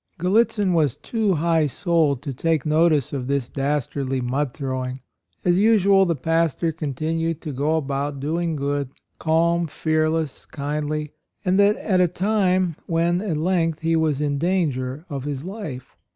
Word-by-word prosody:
Gallitzin 200 Hz, +1 st, +2 dB
was 155 Hz, -7 st, +2 dB
too 215 Hz, -5 st, 0 dB
high 160 Hz, -1 st, +2 dB
souled 155 Hz, -3 st, +1 dB
to 140 Hz, -3 st, -4 dB
take 160 Hz, +2 st, 0 dB
notice 155 Hz, -3 st, +2 dB
of 130 Hz, -3 st, -3 dB
this 140 Hz, -3 st, -1 dB
dastardly 135 Hz, -1 st, -1 dB
mud 130 Hz, +3 st, -1 dB
throwing. 130 Hz, -3 st, -4 dB, 0.4 s
As 175 Hz, 0 st, +3 dB
usual, 200 Hz, -3 st, +5 dB
the 170 Hz, -, +1 dB
pastor 165 Hz, +2 st, 0 dB
continued 160 Hz, +2 st, -2 dB
to 155 Hz, -, -5 dB
go 145 Hz, +4 st, 0 dB
about 140 Hz, -1 st, -2 dB
"doing 165 Hz, +3 st, -1 dB
good" 140 Hz, -1 st, -2 dB, 0.2 s
— -, -, -48 dB
calm, 170 Hz, +1 st, +2 dB
fearless, 155 Hz, -1 st, -1 dB
kindly, 150 Hz, +1 st, -3 dB, 0.2 s
— -, -, -42 dB
and 185 Hz, +1 st, +2 dB
that 205 Hz, +1 st, +5 dB
at 185 Hz, -4 st, +1 dB
a 180 Hz, -, +5 dB
time 185 Hz, -2 st, +1 dB
when, 170 Hz, +2 st, +1 dB
at 185 Hz, -7 st, -2 dB
length, 165 Hz, -1 st, 0 dB
he 165 Hz, 0 st, +1 dB
was 155 Hz, -3 st, +1 dB
in 145 Hz, -1 st, 0 dB
danger 150 Hz, -5 st, -1 dB
of 140 Hz, -5 st, -5 dB
his 140 Hz, -1 st, -4 dB
life. 185 Hz, -, -7 dB
160 Hz, 160 wpm, -23 LUFS, 140-175 Hz, 0.4 s, usual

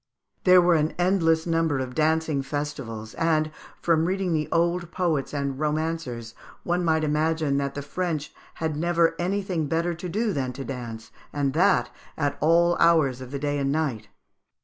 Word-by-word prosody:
There 180 Hz, -1 st, +7 dB
were 175 Hz, 0 st, +4 dB
an 155 Hz, -1 st, +1 dB
endless 170 Hz, -3 st, +2 dB
number 165 Hz, -3 st, +1 dB
of 130 Hz, -1 st, -4 dB
dancing 160 Hz, -1 st, +1 dB
festivals, 135 Hz, -6 st, -5 dB
and, 155 Hz, -2 st, +1 dB, 0.3 s
from 165 Hz, -1 st, +2 dB
reading 185 Hz, -1 st, 0 dB
the 150 Hz, -1 st, -1 dB
old 170 Hz, +1 st, +1 dB
poets 170 Hz, -6 st, -1 dB
and 140 Hz, -2 st, -3 dB
romancers, 150 Hz, -7 st, -2 dB, 0.3 s
one 175 Hz, +1 st, 0 dB
might 160 Hz, -2 st, +2 dB
imagine 155 Hz, -1 st, +1 dB
that 140 Hz, 0 st, -2 dB
the 145 Hz, -, -4 dB
French 155 Hz, 0 st, -3 dB, 0.2 s
had 160 Hz, -2 st, -2 dB
never 170 Hz, +1 st, +2 dB
anything 185 Hz, -3 st, -1 dB
better 165 Hz, +3 st, 0 dB
to 175 Hz, +2 st, -6 dB
do 215 Hz, +3 st, 0 dB
than 130 Hz, -4 st, -2 dB
to 135 Hz, +1 st, -6 dB
dance, 120 Hz, -4 st, -7 dB, 0.2 s
and 140 Hz, -2 st, -1 dB
that 180 Hz, +6 st, +3 dB, 0.3 s
at 145 Hz, -2 st, 0 dB
all 170 Hz, +2 st, +4 dB
hours 155 Hz, -7 st, +4 dB
of 130 Hz, -, -8 dB
the 140 Hz, -, -4 dB
day 145 Hz, +1 st, -1 dB
and 135 Hz, 0 st, 0 dB
night. 140 Hz, -9 st, -1 dB
155 Hz, 170 wpm, -25 LUFS, 140-170 Hz, 0.3 s, There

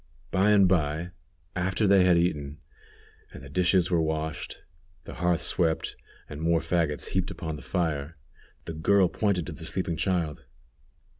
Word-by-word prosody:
By 95 Hz, +3 st, +3 dB
and 100 Hz, -2 st, +6 dB
by, 80 Hz, -1 st, 0 dB, 0.4 s
after 95 Hz, +3 st, 0 dB
they 95 Hz, -2 st, +5 dB
had 90 Hz, -2 st, +5 dB
eaten, 75 Hz, -4 st, -1 dB, 0.7 s
and -, -, -11 dB
the 70 Hz, -, -10 dB
dishes 90 Hz, +2 st, +2 dB
were 85 Hz, -2 st, +3 dB
washed, 80 Hz, 0 st, -3 dB, 0.4 s
the -, -, -9 dB
hearth 85 Hz, 0 st, 0 dB
swept, 80 Hz, -3 st, 0 dB, 0.3 s
and 75 Hz, 0 st, -8 dB
more 85 Hz, 0 st, +2 dB
fagots 80 Hz, -3 st, -1 dB
heaped 95 Hz, -1 st, -1 dB
upon 80 Hz, -2 st, -5 dB
the 75 Hz, -, -9 dB
fire, 80 Hz, -3 st, -2 dB, 0.5 s
the 85 Hz, -, -5 dB
girl 95 Hz, +4 st, +3 dB
pointed 100 Hz, -6 st, 0 dB
to -, -, -6 dB
the 80 Hz, +1 st, -9 dB
sleeping 85 Hz, 0 st, -1 dB
child. 85 Hz, -5 st, -1 dB
85 Hz, 155 wpm, -27 LUFS, 80-90 Hz, 0.7 s, and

